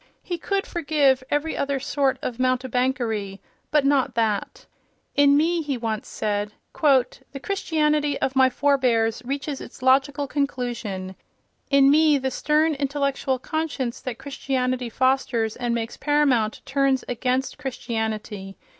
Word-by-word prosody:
He 350 -2 -4
could 395 +3 -1
forgive 285 -5 +2
every 295 +2 0
other 280 -1 -1
sort 275 0 0
of 245 -1 -4
mountebankery, 250 -5 0 0.3
but 300 -2 +2
not 275 -2 +2
that. 220 -3 -1 0.5
"In 285 0 +5
me," 335 +3 +2
he 285 -4 -2
once 225 -2 -3
said, 210 0 -2 0.2
"the 275 -1 +1
Christianity 300 -5 0
of 265 - -1
my 260 -1 +5
forbears 250 -5 +1
reaches 275 +2 -4
its - - -11
logical 275 +2 +3
conclusion. 240 -9 -3 0.6
In 275 -1 +6
me 305 0 +5
the 265 -1 -2
stern 310 +4 +2
intellectual 275 -1 -1
conscience 280 -3 -3
that 250 -3 -5
Christianity 255 -3 -2
fosters 250 -3 +1
and 240 -1 -1
makes 230 0 -4
paramount 275 -7 +1
turns 270 -1 +1
against 255 +2 -1
Christianity. 220 -6 -4
265 Hz, 130 wpm, -24 LUFS, 240-285 Hz, 0.6 s, In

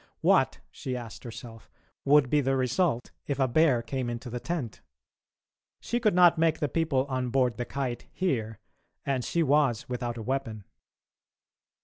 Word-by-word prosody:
What, - - +3
she 130 -1 -5
asked 115 -2 -9
herself, 115 -2 -10 0.4
would 145 -1 +5
be 150 - +4
the 135 0 +1
result 130 0 0 0.2
if 140 - -1
a 135 -1 +2
bear 130 -2 +3
came 125 +1 -3
into 120 +1 -6
the 120 - -3
tent? 150 -7 -4 1.0
She 240 - -2
could 215 -6 +2
not 175 -2 +6
make 160 -1 +3
the 150 - -1
people 145 -3 0
on 130 -2 -2
board 125 -2 +1
the 120 - -3
Kite 130 -3 -4
hear, 115 - -2 0.5
and 135 -3 0
she 170 +6 0
was 140 -6 +2
without 120 -1 -3
a 115 - -5
weapon. 115 -4 -3
130 Hz, 160 wpm, -28 LUFS, 120-150 Hz, 1.0 s, not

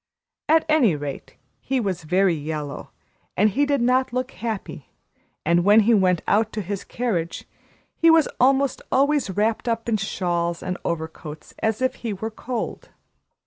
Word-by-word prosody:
At 320 0 +4
any 280 - +4
rate, 145 -1 -7 0.2
he 265 0 -1
was 185 -7 -3
very 185 +2 +3
yellow 150 -2 -5 0.5
and 210 +2 +4
he 285 +7 +1
did 285 -3 +1
not 255 +1 +2
look 255 +1 -2
happy; 225 -4 -6 0.6
and 170 +2 +3
when 205 +3 +6
he 230 +3 +3
went 185 -5 +3
out 215 +2 +2
to 215 - -2
his 200 +1 -4
carriage, 190 -9 -3 0.5
he 330 - +5
was 325 -1 +5
almost 270 +1 +3
always 285 -1 +2
wrapped 215 +5 0
up 230 0 -1
in 225 -2 +2
shawls 175 -3 -2
and 180 0 -2
overcoats, 160 -2 -5
as 220 +3 0
if 260 - 0
he 230 -3 -2
were 220 +3 -5
cold. 240 +2 -5
215 Hz, 160 wpm, -23 LUFS, 175-255 Hz, 0.6 s, when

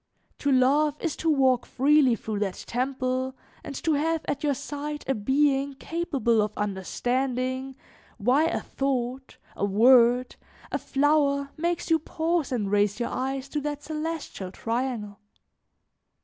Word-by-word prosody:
To 285 - +1
love 285 +3 +3
is 335 - -2
to 325 - 0
walk 260 -4 +3
freely 275 -2 +3
through 215 -1 -4
that 195 -3 -3
temple 255 +1 -2 0.3
and 280 - -7
to 320 - +2
have 320 +2 0
at 285 0 -2
your 290 -2 +2
side 295 +2 -5
a 270 - +2
being 275 +4 +1
capable 275 -8 0
of 210 0 -1
understanding 255 +6 -2 0.4
why 250 +8 +3
a 330 - -1
thought, 260 -1 -3 0.2
a - - -4
word, 240 +4 +5 0.3
a - - -1
flower 280 -1 +1
makes 340 +1 -2
you 325 - +5
pause 325 -1 -1
and 210 -6 -1
raise 205 0 +2
your 235 - -1
eyes 270 +1 -3
to 295 - -2
that 290 0 -4
celestial 310 - -4
triangle. 225 -2 -3
265 Hz, 140 wpm, -26 LUFS, 245-295 Hz, 0.4 s, word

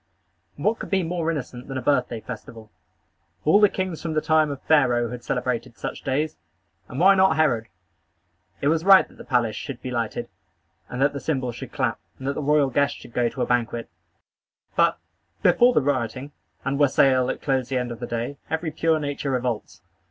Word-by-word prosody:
What 210 - 0
could - - -6
be 195 -2 +2
more 165 -1 -1
innocent 130 -5 -5
than 135 - -4
a - - -2
birthday 125 -5 +1
festival? 110 -1 -9 0.7
All 160 +7 +6
the 210 - +7
kings 185 -4 -3
from 165 -2 -3
the - - +4
time 155 -1 +3
of 140 -2 -5
Pharaoh 125 -6 +3
had 125 -1 -7
celebrated 125 -1 -2
such - - -5
days; 150 +4 -1 0.5
and 130 - -6
why 190 +3 +7
not 190 -4 +4
Herod? 125 -8 +2 0.9
It 140 - +1
was 160 +1 +1
right 195 0 +7
that - - -21
the - - -8
palace 120 -5 +1
should 125 +3 -6
be 130 - -6
lighted, 115 -3 -2 0.6
and 125 - -5
that 145 - +2
the 140 - -4
cymbals 130 -6 -2
should 135 -3 -8
clap, 130 -5 -1 0.2
and 130 - -6
that 140 - +1
the 150 - -4
royal 145 -1 +3
guests 140 +3 +1
should 120 - -14
go 120 -1 +1
to - - -3
a - - +1
banquet; 120 -3 -1 0.8
but, - - +3 0.5
before 245 +1 +5
the 150 - +2
rioting 130 0 -2 0.3
and 140 +1 -1
wassail 130 -2 +4
that - - -4
closed 135 -3 0
the 135 - -2
scene 125 -1 -2
of 115 - -7
that 120 - -6
day, 120 +4 -3
every 160 0 -2
pure 160 0 +1
nature 145 -1 -3
revolts. 125 -4 -3
135 Hz, 200 wpm, -24 LUFS, 125-155 Hz, 0.9 s, the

